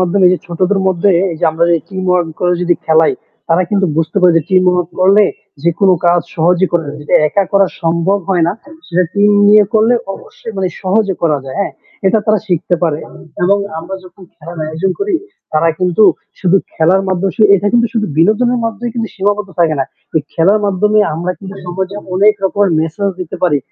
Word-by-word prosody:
মাধ্যমে 185 +1 +3
যে 185 - 0
ছোটদের 185 +3 0
মধ্যে 190 +1 +1 0.2
এই - - -7
যে - - +1
আমরা 170 +1 +1
যে - - +4
টিমওয়ার্ক 180 -3 0
করে 180 0 +2
যদি 175 -1 +2
খেলাই 160 0 +3 0.4
তারা 165 +3 +3
কিন্তু 200 -2 +1
বুঝতে 165 +4 -2
পারে 180 -1 +5
যে 165 - +2
টিমওয়ার্ক 180 -2 +2
করলে 200 +3 +5 0.4
যেকোনো 170 +3 +2
কাজ 175 0 +4
সহজেই 175 +3 +2
করা 170 -2 +1
যায়। 150 +1 -7
যেটা 150 - -2
একা 200 +4 +1
করা 195 -1 +4 0.2
সম্ভব 170 +4 +1
হয় 175 -3 +2
না - - 0 0.3
সেটা 180 0 +1
টিম 205 0 +3 0.2
নিয়ে 210 0 +6
করলে 220 +3 +4 0.2
অবশ্যই 225 - -11
মানে 190 -1 -1
সহজে 195 +1 +1
করা 155 -4 +2
যায় 130 - -7
হ্যাঁ - - -2 0.3
এটা 205 +4 +3
তারা 215 -1 +3
শিখতে 175 0 0
পারে। 160 -3 0 0.4
এবং 200 +3 +3 0.2
আমরা 170 +4 -6
যখন 185 +1 -16
খেলার 165 +1 -10
আয়োজন 160 +5 -2
করি 400 -2 -1 0.4
তারা 155 +2 +2
কিন্তু 180 +2 +1 0.4
শুধু 185 0 +3 0.2
খেলার 180 +4 +2
মাধ্যমে 190 +1 -1
সু 220 - +1
এটা 200 +2 -2
কিন্তু 235 0 +3
শুধু 220 -2 -1
বিনোদনের 235 +8 +2
মাধ্যমে 230 +2 -3
কিন্তু 225 -3 -3
সীমাবদ্ধ 205 +1 -1
থাকে 160 -2 +3
না - - +1 0.3
তো - - -2 0.2
খেলার 195 +6 +3
মাধ্যমে 210 +2 +1 0.2
আমরা 175 +3 -3
কিন্তু 195 -1 -9
সমাজে 190 +2 -4 0.2
অনেক 210 +3 +4
রকমের 200 0 +1
মেসেজ 165 +5 -2
দিতে 180 - -6
পারি 155 -6 +2
185 Hz, 190 wpm, -14 LUFS, 170-200 Hz, 0.4 s, নিয়ে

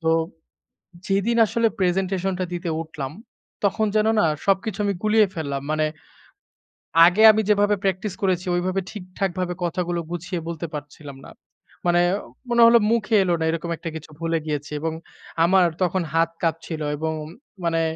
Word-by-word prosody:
তো 165 - -7 1.0
যেদিন 200 +4 +1
আসলে 230 +2 +1
প্রেজেন্টেশন 190 +1 0
টা - - 0
দিতে 175 -1 -3
উঠলাম, 150 -4 -6 0.5
তখন 205 +2 +2
যেন 215 0 +3
না? - - +4 0.2
সবকিছু 195 +1 0
আমি 200 - +1
গুলিয়ে 215 0 +4
ফেললাম। 140 -4 -3
মানে 155 0 +1 1.1
আগে 175 +5 +7
আমি 215 - +1
যেভাবে 205 0 +3
প্র্যাকটিস 195 +1 -1
করেছি, 185 -2 0
ওইভাবে 185 +2 0
ঠিকঠাকভাবে 185 -2 -3
কথাগুলো 175 0 -1
গুছিয়ে 175 +1 -4
বলতে 170 0 -4
পারছিলাম 145 -1 -8
না। - - -12 0.5
মানে 175 0 +4 0.5
মনে 235 0 +3
হলো 235 0 +7
মুখে 225 -1 +1
এলো 180 - +1
না, 160 - -1
এরকম 165 +1 -3
একটা 165 - -5
কিছু 160 0 -8
ভুলে 165 0 0
গিয়েছি। 150 -1 -4
এবং 160 +1 -2 0.5
আমার 185 +1 +5 0.2
তখন 185 0 +1
হাত 165 0 +3
কাঁপছিল 165 -1 -2 0.2
এবং 160 +1 -2 0.5
মানে 165 -1 +1
180 Hz, 150 wpm, -23 LUFS, 165-195 Hz, 1.1 s, আগে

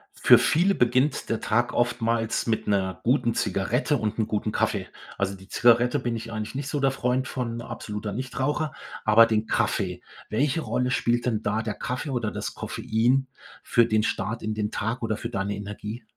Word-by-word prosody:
Für - - +7
viele 180 +5 +3
beginnt 130 0 +1
der 115 - -1
Tag 120 +3 +1
oftmals 115 -2 0
mit 110 -1 0
'ner 95 -3 0
guten 120 -1 +2
Zigarette 110 - 0
und 110 -3 -2
'n 110 - +1
guten 105 0 -1
Kaffee. - - 0 0.3
Also 100 0 -1
die 95 0 -15
Zigarette 120 +3 +4
bin 120 -2 -2
ich 115 0 -6
eigentlich 110 +2 -5
nicht 135 0 -3
so 145 - -1
der 135 -1 +3
Freund 130 0 0
von- 120 -2 -3
absoluter 105 -2 -5
Nichtraucher- 130 +5 -2 0.3
aber 110 +1 +7
den 110 -1 0
Kaffee. - - 0 0.3
Welche 135 +7 +1
Rolle 125 -4 -1
spielt 120 -1 +1
denn 110 -4 0
da 105 +2 0
der 110 -1 -3
Kaffee 135 +2 -4
oder 120 -5 -1
das - - -4
Koffein 125 +5 0 0.4
für 120 - +4
den 110 -1 +1
Start 115 +1 -2
in 110 0 -1
den 105 0 -2
Tag 115 +4 -2
oder 110 -2 -1
für 115 - -5
deine 100 -3 -2
Energie? 105 +3 -7
115 Hz, 185 wpm, -26 LUFS, 110-125 Hz, 0.4 s, Für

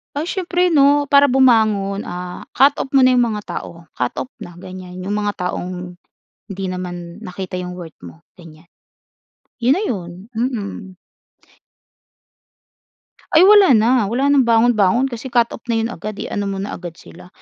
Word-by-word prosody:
Ay, 290 - -1
siyempre 360 -1 0
‘no, 285 -1 +4
para 285 0 +6
bumangon, 220 -7 +2
ah, 180 0 -7
cut 280 +3 +4
off - - -3
mo 270 - +6
na 255 - +6
'yong 245 -1 +3
mga 210 - -4
tao, 170 -3 -8
cut 125 -1 -1
off 130 0 -5
na, 175 - -10
ganyan. 180 0 -10
'Yong 195 - -4
mga 205 -1 -1 0.2
taong, 180 0 -6 0.5
hindi 195 -2 -6
naman 175 -2 -6
nakita 185 0 -6
‘yong 180 0 -5
worth 175 -3 -10
mo, 85 -2 -13 0.2
gan'yan, 165 -1 -15 1.0
‘yon 250 +3 +4
na - - -1
‘yon. 175 -6 -4 0.2
Mm. 210 -5 -4 2.4
Ay, 325 - +8
wala 395 - +7
na, 225 0 +3
wala 260 +6 +1
nang 270 -4 +3
bangon-bangon 235 +2 +3
kasi 240 +2 -6
cut 240 -2 +1
off - - -7
na 235 - 0
‘yon 230 - -3
agad, 215 -3 -6
eh. - - -7
I-ano 205 -1 -2
mo 195 - -3
na 200 - -5
agad 175 -2 -8
sila, 180 -1 -15
210 Hz, 170 wpm, -19 LUFS, 180-255 Hz, 2.4 s, Ay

